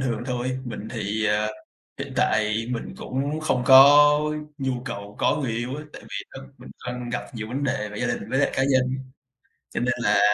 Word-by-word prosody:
thường 120 -3 -1
thôi. 125 0 -2
Mình 110 -3 -6
thì, 110 -1 -1
à, 105 0 +1 0.5
hiện - - -5
tại 110 +1 +1
mình 120 -2 -4
cũng 140 +4 -3
không 130 -5 0
có 135 +2 +9 0.6
nhu 135 -1 -1
cầu 100 -5 -7
có - - +2
người 140 -5 -2
yêu 120 +4 -3
á, 150 - -6
tại - - -11
vì - - -6
thật 135 - -8 0.2
mình - - -12 0.2
đang 125 0 -4
gặp 120 0 -3
nhiều 110 -1 -5
vấn 135 +4 -2
đề 105 -5 -1
về 105 0 -8
gia 125 - 0
đình - - -3
với 135 - +1
lại 140 - +3
cá 135 - +1
nhân, 130 -1 +2 0.8
cho - - -3
nên 125 0 +1
là - - +3
125 Hz, 210 wpm, -24 LUFS, 110-135 Hz, 0.8 s, có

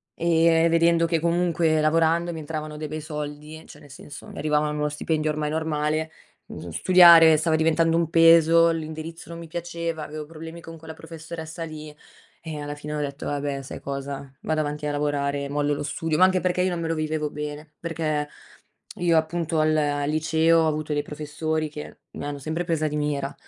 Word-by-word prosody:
ehm, 165 0 +3
vedendo 165 0 +3
che 165 -1 +1
comunque 170 -1 +1
lavorando 165 +2 +2
mi 160 - -7
entravano 155 0 -6
dei 155 0 -5
bei 155 +1 -5
soldi, 150 +1 -7
cioè - - -13
nel 145 - -16
senso, 145 +1 -11
mi - - -11
arrivava 150 0 +1
uno 150 0 -1
stipendio 155 +1 -1
ormai 150 0 -2
normale, 155 0 -1 0.4
mhmm, 85 - -8
s 80 - -4
studiare 170 -3 +8
stava 160 +1 +1
diventando 165 +1 +2
un 170 -2 0
peso, 165 0 +6
l'indirizzo 160 +1 -6
non 170 - -7
mi 170 - -8
piaceva, 170 -1 -4
avevo 155 0 -7
problemi 165 +2 -9
con 165 0 -10
quella 160 0 -9
professoressa 160 0 -8
lì, 155 -1 -9 0.5
eh, 160 -2 -6
alla 145 0 -5
fine 150 +1 -6
ho 150 - -2
detto: 140 0 -5
"Va 145 - -2
beh 140 -1 -3
sai 130 - -8
cosa? 140 0 -6
Vado 155 0 -1
avanti 150 0 -4
a - - -1
lavorare 145 -1 -1
e 140 - -6
mollo 145 0 0
lo 145 - -4
studio". 155 +2 -2
Ma 185 - +5
anche 185 0 +2
perché 180 0 0
io 185 - +1
non 175 - -3
me 165 - -2
lo 165 - 0
vivevo 155 -1 -2
bene. 150 +1 -7
Perché 155 -3 -2 0.7
io 170 -2 +2
appunto 160 0 0
al 155 0 +3
al 145 -1 0
liceo 160 +1 +3
ho 160 - +2
avuto 155 0 -2
dei 145 0 0
professori 155 +1 -3
che 150 0 -9 0.2
mi - - -6
hanno 145 0 -5
sempre 160 +5 -3
presa 160 -2 0
di 150 - -4
mira. 145 -1 -2
155 Hz, 200 wpm, -24 LUFS, 150-165 Hz, 0.7 s, studiare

